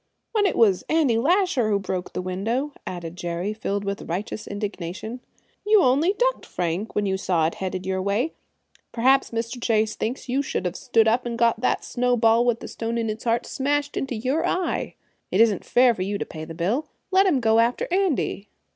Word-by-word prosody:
"When 415 -2 +3
it - - -1
was 200 -5 +4
Andy 290 -8 +3
Lasher 345 - +2
who 205 - +3
broke 185 -2 -4
the 180 - -3
window," 225 +11 -2
added 170 -2 -6
Jerry, 175 +3 -3
filled 205 -2 -3
with 200 -3 -4
righteous 200 +5 -4
indignation. 205 +2 -5 0.4
"You 420 -1 +5
only 290 +9 +3
ducked, - - 0
Frank, 180 +4 -3
when 205 - +1
you 190 -1 0
saw 175 -4 +1
it 160 - 0
headed 185 -1 -3
your 190 0 -1
way. 205 +11 0 0.6
Perhaps 265 +3 +3
Mr. 230 +1 -4
Chase 220 -2 +1
thinks 250 +4 -4
you 260 +3 +1
should 265 - -3
have 180 +1 -2
stood 225 -3 +2
up 240 +2 +2
and 235 -1 -3
got 230 -1 +2
that 255 - 0
snowball 240 -2 +2
with 235 -1 +1
the - - -6
stone 230 +1 -3
in 225 -2 0
its 215 +2 -8
heart 230 0 +1
smashed 285 +1 -1
in 270 - -1
your 260 +7 -1
eye. 365 0 -1 0.3
It 190 - 0
isn't 220 -4 +4
fair 245 0 +4
for 190 - -6
you 200 +2 -1
to - - -3
pay 155 -1 -8
the 165 - -9
bill. 210 - -1 0.2
Let 385 +1 +5
him 305 -8 +3
go 225 -1 +3
after 235 +2 +1
Andy." 345 - 0
230 Hz, 200 wpm, -24 LUFS, 195-265 Hz, 0.6 s, You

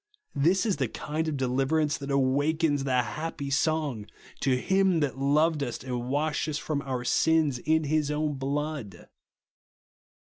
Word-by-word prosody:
This 170 +8 +2
is 205 -7 +1
the 135 -3 0
kind 155 +7 -3
of 150 -2 -2
deliverance 135 +4 +1
that 140 0 -6
awakens 145 +2 +1
the 125 -2 +2
happy 145 +1 -5
song, 140 -7 0 0.3
"To 130 -1 +2
him 190 +1 +2
that 135 -2 -1
loved 150 +3 +2
us, 120 -4 -4
and 125 -1 -4
washed 150 +3 0
us 150 - -2
from 150 -2 -2
our 130 -3 -3
sins 155 0 +2
in 160 +4 +1
his 150 0 0
own 150 0 -1
blood." 140 - -4
145 Hz, 155 wpm, -27 LUFS, 135-155 Hz, 0.3 s, This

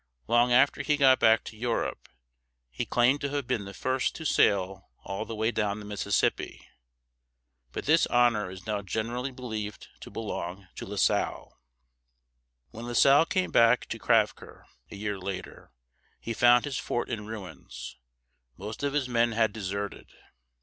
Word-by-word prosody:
Long 120 +2 +3
after 130 +3 +4
he 150 -1 +1
got 135 -2 +5
back 110 0 +5
to - - -9
Europe, 115 +1 -3 0.6
he - - -4
claimed 125 +4 +3
to 140 - -1
have 145 -2 -2
been 100 -4 -2
the 100 - -8
first 130 0 -1
to 160 - -7
sail 95 -7 +1
all 100 +3 -4
the 115 - -6
way 110 +2 0
down 105 -3 -1
the 105 - -9
Mississippi; 100 -1 -1 1.0
but - - -5
this 160 +3 +4
honor 120 -5 +2
is 95 0 -10
now 105 -2 -2
generally 115 +7 -3
believed 110 -5 -6
to - - -10
belong 95 -3 -5
to - - -6
La - - -6
Salle. - - 0 1.2
When 115 +2 -8
La 120 - -4
Salle 140 +6 +6
came 185 -2 0
back 115 +1 +4
to - - -4
Crèvecœur - - 0 0.3
a - - -9
year 100 -1 -3
later, 95 0 -7 0.5
he 115 - -4
found 120 +2 +5
his 135 -3 -3
fort 120 - -2
in 105 -3 -5
ruins; 90 - -8 0.6
most 105 +4 -7
of 140 -1 -1
his 145 -3 0
men 120 -1 +2
had 110 -2 +2
deserted. 100 -1 -5
115 Hz, 165 wpm, -28 LUFS, 100-125 Hz, 1.2 s, Salle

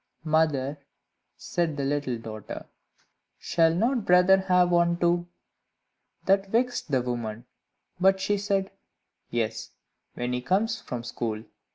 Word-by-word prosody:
"Mother," 150 -3 +1 0.6
said 165 -4 -2
the 140 - -1
little 140 -3 -1
daughter, 110 -2 -8 0.7
"shall 165 -1 +2
not 235 +5 +1
brother 180 +1 +6
have 180 -2 +3
one 170 0 +3
too?" 175 0 +1 1.0
That 195 0 +3
vexed 245 -2 0
the 130 -3 +1
woman, 120 -2 -4 0.5
but 190 +1 +4
she 200 +1 0
said, 195 -1 0 0.6
"Yes, 115 -2 -2 0.5
when 125 +1 -2
he 125 - -1
comes 195 - 0
from 120 -2 -5
school." 115 -2 -4
170 Hz, 125 wpm, -27 LUFS, 125-190 Hz, 1.0 s, brother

